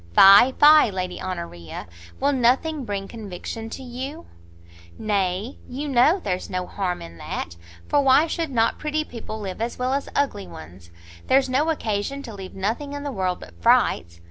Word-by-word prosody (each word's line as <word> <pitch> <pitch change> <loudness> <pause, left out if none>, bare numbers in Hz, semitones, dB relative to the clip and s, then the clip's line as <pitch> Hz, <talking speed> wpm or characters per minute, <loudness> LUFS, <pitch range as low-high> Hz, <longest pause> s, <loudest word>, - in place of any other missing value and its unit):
"Fie, 200 +6 +9
fie, 300 -3 +7
Lady 185 -2 -4
Honoria! 170 - -6 0.3
will 280 +2 +2
nothing 270 +3 +1
bring 200 -2 -4
conviction 225 +1 -7
to 265 - -7
you?" 265 +6 -7 0.7
"Nay, 200 +2 -1
you 280 +4 -4
know, 280 +7 +4
there's 185 -1 -3
no 185 -1 -2
harm 180 -1 -3
in 85 0 -12
that, 85 - -5 0.3
for 290 - +3
why 275 +3 +5
should 330 -1 -2
not 230 -4 +1
pretty 305 0 -1
people 230 -5 -8
live 195 0 -6
as 235 +1 -3
well 255 +1 0
as 280 0 -2
ugly 205 -9 -1
ones? 85 +2 -12 0.4
There's 265 0 +3
no 285 +5 +1
occasion 275 -1 -2
to 235 -5 -8
leave 190 -2 -9
nothing 225 +9 -2
in 285 0 -5
the 285 - -3
world 185 -5 -1
but 85 - -11
frights. 85 0 +2
225 Hz, 170 wpm, -23 LUFS, 185-275 Hz, 0.7 s, Fie